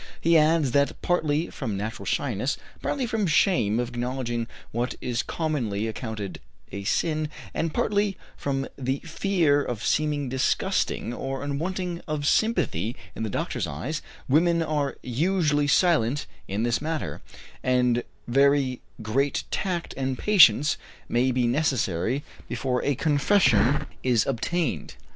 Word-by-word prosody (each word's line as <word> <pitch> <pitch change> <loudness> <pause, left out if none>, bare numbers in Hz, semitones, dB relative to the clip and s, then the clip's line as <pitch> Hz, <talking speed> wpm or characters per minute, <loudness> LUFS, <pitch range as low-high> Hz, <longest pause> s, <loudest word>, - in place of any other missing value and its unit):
He 170 +1 +3
adds 155 -3 +4
that 140 +2 +2
partly 160 -2 +1
from 110 -8 -3
natural 110 +4 -5
shyness, - - 0 0.2
partly 270 -3 -1
from 220 -4 0
shame 145 - +3
of 120 -1 -1
acknowledging 120 -1 -2 0.2
what 120 +2 -2
is 120 -1 -1
commonly 125 -11 -2
accounted 110 -3 -5 0.3
a 100 0 -6
sin, 155 - 0 0.2
and 165 -1 -1
partly 205 +2 +1 0.2
from 135 -1 -2
the 130 +1 0
fear 165 -4 +2
of 115 -5 -4
seeming 150 -2 +1
disgusting 130 -2 0
or 135 +2 -4
unworthy 175 +5 -3
of 150 -2 -2
sympathy 125 - +1 0.2
in - - -5
the 110 - -1
doctor's 120 - -2
eyes, 85 - -4 0.3
women 170 +4 +3
are 150 -4 -1
usually 150 +2 +1
silent 145 -5 +3 0.2
on 100 +3 -1
this 120 +1 +1
matter, 160 0 -3 0.4
and 125 -1 +2 0.2
very 135 0 +3 0.2
great 135 +6 0
tact 175 -3 -2
and 130 -1 -2
patience 150 - +6 0.3
may 125 +2 +2
be 125 -1 +1
necessary 125 - 0 0.3
before 125 -2 -1
a 145 - +1
confession 145 - +3 0.2
is 120 -4 +2
obtained. 140 +5 -1
140 Hz, 130 wpm, -26 LUFS, 120-160 Hz, 0.4 s, patience